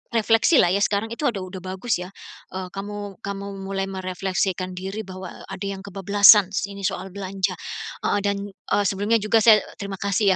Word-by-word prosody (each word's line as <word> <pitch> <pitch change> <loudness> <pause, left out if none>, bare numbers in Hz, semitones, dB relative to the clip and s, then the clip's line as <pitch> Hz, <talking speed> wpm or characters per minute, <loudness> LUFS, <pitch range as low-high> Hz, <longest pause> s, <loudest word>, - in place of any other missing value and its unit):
refleksilah 225 - +4
ya 200 - +2
sekarang 205 +2 0
itu 285 +5 -1
ada 200 -6 -2
udah 185 0 -7
bagus 190 +3 -2
ya. 180 - -5 0.5
Eee, 185 -1 -4
kamu 205 0 -6
kamu 200 -2 -5 0.2
mulai 195 0 -2
merefleksikan 185 0 -2
diri 195 +4 -4
bahwa, 185 -1 -8
eee, - - -12
ada 200 - -5
yang 195 -1 -5
kebablasan 200 0 +6
sini 200 -1 -3
soal 190 +1 -4
belanja. 190 0 -2 0.5
Heeh 205 - +2
dan, 200 0 +1
eee, 205 +1 -1
sebelumnya 205 +4 +2
juga 215 +2 +3
saya 220 -2 +8 0.2
terima 200 -1 -5
kasih 200 0 +2
200 Hz, 175 wpm, -23 LUFS, 190-205 Hz, 0.5 s, saya